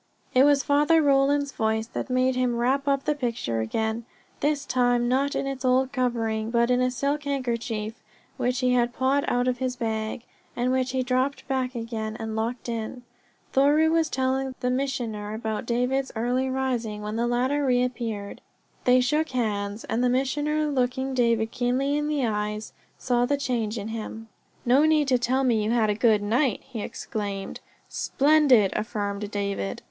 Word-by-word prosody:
It 255 +2 +6
was 285 -1 +4
Father 295 +3 +4
Roland's 280 -1 +3
voice 220 -1 0
that 235 - -5
made 255 0 +2
him 250 -1 +1
wrap 265 +4 +1
up 275 -1 +1
the 300 - +2
picture 230 - -2
again, 220 - -2 0.4
this 290 -1 0
time 245 -2 +2
not 270 +3 +1
in - - -1
its 270 -1 -4
old 260 +1 +2
covering, 225 -4 -1
but 235 +1 +2
in 250 0 +3
a 255 - +2
silk 280 +3 -2
handkerchief 235 -5 -3 0.3
which 250 +1 -1
he 250 0 +3
had 240 -1 +2
pawed 270 +2 +1
out 245 +1 +1
of 250 -1 0
his 255 -1 -1
bag, 220 -1 -3 0.3
and 245 +1 0
which 260 0 +1
he 260 0 0
dropped 255 +2 -1
back 260 -2 -1
again, 225 -2 -4
and 220 -1 -4
locked 230 +3 -3
in. 230 +1 -4 0.5
Thoreau 295 +4 +4
was 325 -1 +2
telling 265 0 -1
the 250 0 0
Missioner 235 -6 -2
about 220 +1 -4
David's 250 +3 0
early 250 +3 0
rising 240 -5 -2
when 210 +1 -4
the 235 +1 0
latter 255 +4 +1
reappeared. 245 -5 -1 0.4
They 250 0 +5
shook 300 +5 +1
hands, 210 -4 -2
and 235 +2 -1
the 250 - +3
Missioner, 295 +4 0
looking 260 -1 -1
David 230 -3 +2
keenly 260 +3 0
in 295 0 0
the 295 -4 0
eyes, 210 -1 -3 0.2
saw 245 -1 +1
the 285 - +1
change 235 -5 -2
in 210 +1 -5
him. 225 0 -6 0.4
"No 255 +4 +5
need 310 -2 +3
to 255 -2 +3
tell 260 +3 +1
me 230 -4 +2
you 210 - -1
had 225 -2 +2
a - - +1
good 215 -1 +3
night!" 235 +2 +1
he 245 -5 -7
exclaimed. 200 -2 -5 0.3
"Splendid," 275 -8 +3
affirmed 205 -2 -3
David. 200 - -3
250 Hz, 175 wpm, -25 LUFS, 225-270 Hz, 0.5 s, It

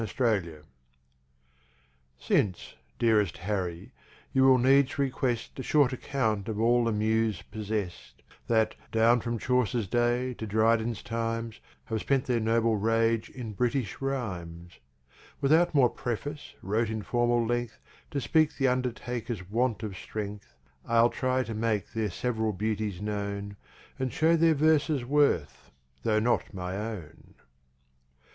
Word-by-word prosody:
5 - - -3
Autoplay 95 - 0 1.5
Since, 90 +6 0 0.2
dearest 105 -7 +2
Harry, 90 -3 -3 0.4
you 130 0 +4
will 130 -1 +7
needs 135 +2 +3
request 130 -3 -1
A - - -1
short 140 -1 +3
account 110 -6 -1
of 110 -1 -3
all 120 +1 +3
the 115 - +1
Muse 110 -1 0
possest, 105 -4 -5 0.2
That, 110 -1 +2 0.2
down 115 +2 +4
from 120 +1 -2
Chaucer's 120 -2 +1
days 120 +3 0
to 110 - -5
Dryden's 110 +2 +1
Times, 115 -1 -3 0.3
Have 110 -1 -2
spent 135 -2 +1
their 125 -2 +1
Noble 115 0 +2
Rage 115 +1 +1
in 120 -4 -7
British 125 +1 -1
Rhimes; 90 -11 -5 0.6
Without 160 +4 +3
more 135 -4 +6
Preface, 145 +5 -5
wrote 110 +3 0
in 110 -1 -3
Formal 120 0 +1
length, 120 -1 -2 0.3
To 140 - -2
speak 155 +4 +2
the 135 -2 +3
Undertakers 120 -5 -3
want 115 -1 0
of 105 -3 -4
strength, 100 - -7 0.3
I'll 115 +1 +3
try 130 0 0
to 115 -1 -6
make 110 -2 -1
they're 110 -2 -1
sev'ral 110 +2 -1
Beauties 105 -1 -2
known, 100 -1 -4 0.4
And 130 -1 -1
show 165 +1 +3
their 165 -1 +4
Verses 150 -3 +2
worth, 140 - +1 0.3
tho' 110 -1 +1
not 115 -2 0
my 90 0 -4
Own. 105 -6 -7
115 Hz, 135 wpm, -28 LUFS, 105-125 Hz, 1.5 s, will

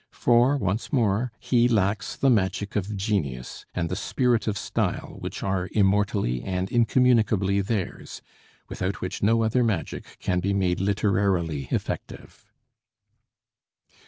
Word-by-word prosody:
For, 120 +4 +3
once 100 -2 -2
more, 115 -3 +1
he 120 -1 +3
lacks 105 -3 0
the 135 - +3
magic 100 -2 0
of 105 0 -2
genius 85 - -3
and 85 -2 -1
the 90 - -3
spirit 120 +2 0
of 105 -2 0
style - - -2
which - - -6
are 95 -1 -1
immortally 100 - +1
and 95 0 -3
incommunicably 110 -5 +3
theirs, 100 -1 -4 0.4
without 95 +2 -3
which 90 +2 -4
no 115 +2 +3
other 115 +3 +2
magic 100 -9 -3
can 90 -1 -1
be 100 +2 0
made 90 -2 +1
literarily 95 -7 0
effective. - - -5
100 Hz, 130 wpm, -25 LUFS, 95-115 Hz, 0.4 s, For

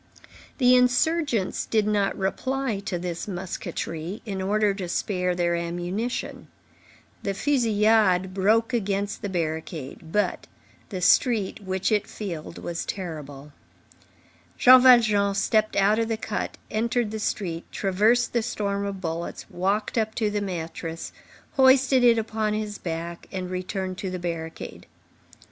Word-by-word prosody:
The 250 -2 +5
insurgents 250 - +2
did 215 -2 +2
not 205 -2 +1
reply 240 +4 -1
to 185 -4 -2
this 175 +1 -4
musketry, 180 0 -5
in 195 -3 -4
order 205 +1 +2
to 190 -3 -5
spare 180 -1 -1
their 175 -1 +1
ammunition. 175 +7 -3 0.7
The 200 -1 -2
fusillade 215 -6 +3
broke 220 +5 +2
against 200 -3 -1
the 205 - -3
barricade; 160 -3 -4
but 210 +3 0 0.4
the 185 -4 -5
street, 215 +2 +3
which 190 0 -1
it 210 -2 +1
filled, 170 -6 -6
was 170 -1 -4
terrible. 150 -6 -6 1.0
Jean 255 0 +8
Valjean 215 -6 +5
stepped 215 +2 +1
out 205 +3 +3
of 225 - +1
the 225 -1 -1
cut, 215 -1 -4
entered 230 0 0
the 220 - -4
street, 175 -6 -3
traversed 215 +5 +2
the 235 - +2
storm 200 -3 -2
of 195 -1 -5
bullets, 165 -1 -4
walked 200 +5 0
up 220 0 -1
to 215 -3 0
the 205 0 -1
mattress, 165 -3 -5 0.5
hoisted 265 -1 +5
it 235 -1 +6
upon 220 -1 -1
his 210 -1 -4
back, 170 0 -5
and 185 -1 -4
returned 185 0 -4
to 190 - -3
the 185 - -4
barricade. 165 -2 -6
200 Hz, 135 wpm, -25 LUFS, 180-220 Hz, 1.0 s, Jean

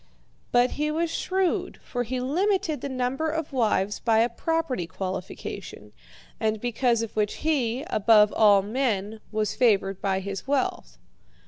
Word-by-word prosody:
But 245 +1 +4
he 300 +1 -1
was 325 +2 -1
shrewd, 370 +1 -1
for 245 - -3
he 250 +2 -2
limited 330 +4 0
the 280 - -4
number 260 +4 -1
of 315 -2 -3
wives 210 -5 +1
by 225 -2 +2
a 235 - +2
property 280 - -2
qualification, 185 +1 -6 0.5
and 220 -1 0
because 240 0 +1
of 230 - -7
which 210 -1 0
he, 260 -4 +1
above 215 - +4
all 205 -3 +5
men, 220 -2 -1
was 215 -1 -1
favoured 195 -5 +2
by 190 -1 0
his 195 +4 -6
wealth. 275 -1 -1
240 Hz, 145 wpm, -26 LUFS, 210-285 Hz, 0.5 s, all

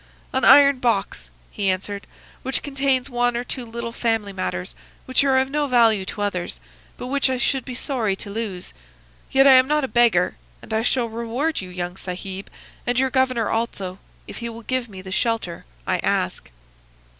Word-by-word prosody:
"'An - - 0
iron 280 -2 +7
box,' 195 - -1 0.2
he 200 -2 0
answered, 200 +2 -3 0.3
'which 265 +1 -2
contains 270 -2 0
one 245 -2 +1
or 240 - -2
two 250 0 -5
little 235 0 -5
family 225 -4 -1
matters 90 - -3 0.3
which 255 +2 +2
are 270 -2 +3
of 265 +1 +1
no 295 0 0
value 225 -6 +4
to 205 +1 -4
others, 180 - -3 0.4
but - - -6
which 275 +1 +1
I 260 - 0
should 260 +1 0
be 250 - -7
sorry 240 -7 -1
to 200 - -8
lose. 205 -4 -5 0.6
Yet 270 0 +5
I 275 - +9
am 255 0 +7
not 300 0 +2
a - - 0
beggar; 235 - +3 0.2
and - - -8
I 220 - +2
shall 245 +1 +2
reward 235 +7 -2
you, 185 - -8
young 180 0 -4
Sahib, 190 +1 -6 0.4
and 245 0 +1
your 265 0 +2
governor 260 -4 +1
also, 195 -5 -2 0.3
if - - -8
he 235 -1 -4
will 230 0 -9
give 255 0 -2
me 190 -2 -10
the 190 - -8
shelter 225 -5 -1 0.2
I - - +1
ask. - - -1
235 Hz, 190 wpm, -23 LUFS, 200-260 Hz, 0.6 s, I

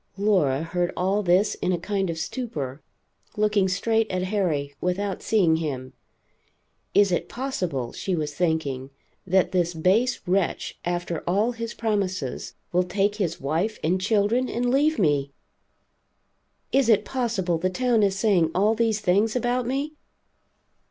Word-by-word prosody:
Laura 180 -9 +2
heard 175 +1 -1
all 190 +3 +1
this 185 +2 +3
in 180 - +1
a 180 - +1
kind 195 +1 -2
of 165 - -3
stupor, 155 - -4 0.6
looking 210 -2 +2
straight 220 +4 +1
at 185 0 -1
Harry, 175 -8 -1
without 190 +2 -1
seeing 180 -7 +3
him. 135 -5 -4 1.0
Is 200 -2 +5
it 175 - -1
possible, 180 - -3
she 190 - -2
was 150 -2 -3
thinking, 145 -6 -1 0.4
that 185 0 +3
this 175 -2 0
base 200 +10 +2
wretch, 185 0 -1
after 175 -1 -2
all 205 +7 +2
his 230 -1 -6
promises, 190 - -2 0.2
will 180 - +3
take 195 +3 0
his 175 -6 -1
wife 165 +10 -1
and 180 +4 +1
children 220 +5 +2
and 245 +1 0
leave 295 +4 +3
me? 145 -6 +1 1.4
Is 270 -3 +3
it 220 - +4
possible 210 -10 -1
the 185 - +1
town 240 +3 +1
is 195 -1 +2
saying 195 -7 +3
all 205 +4 +3
these 225 -2 +1
things 210 +4 +2
about 245 0 0
me? 280 +4 -2
190 Hz, 145 wpm, -25 LUFS, 170-220 Hz, 1.4 s, Is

